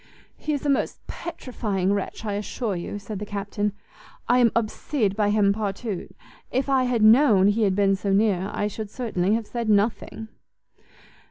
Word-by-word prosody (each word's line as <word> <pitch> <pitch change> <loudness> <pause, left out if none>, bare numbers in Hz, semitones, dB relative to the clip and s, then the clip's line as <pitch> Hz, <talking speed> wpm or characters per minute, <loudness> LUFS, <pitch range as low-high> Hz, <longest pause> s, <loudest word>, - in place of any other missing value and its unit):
"He 305 - -3
is 290 0 -3
a - - +1
most 275 - -1
petrifying 210 - -3
wretch, 205 +2 -4
I 205 - -2
assure 210 +1 -3
you," 175 +3 -5
said 205 0 -6
the - - -4
Captain; 205 +1 -2 0.6
"I 245 +1 +4
am 235 -3 +5
obsede 220 -1 0
by 210 -1 +2
him 205 -1 +3
partout; 205 -1 -4 0.4
if 260 +2 -1
I 265 -2 +3
had 240 -3 +1
known 215 -4 +6
he 215 +2 +1
had 190 -2 +1
been 195 -1 +3
so 195 +1 -2
near, 195 -2 +2
I 205 - -1
should 210 0 -4
certainly 210 -4 0
have 230 -1 -2
said 235 0 -3
nothing." 215 +1 0
210 Hz, 175 wpm, -24 LUFS, 200-230 Hz, 0.6 s, known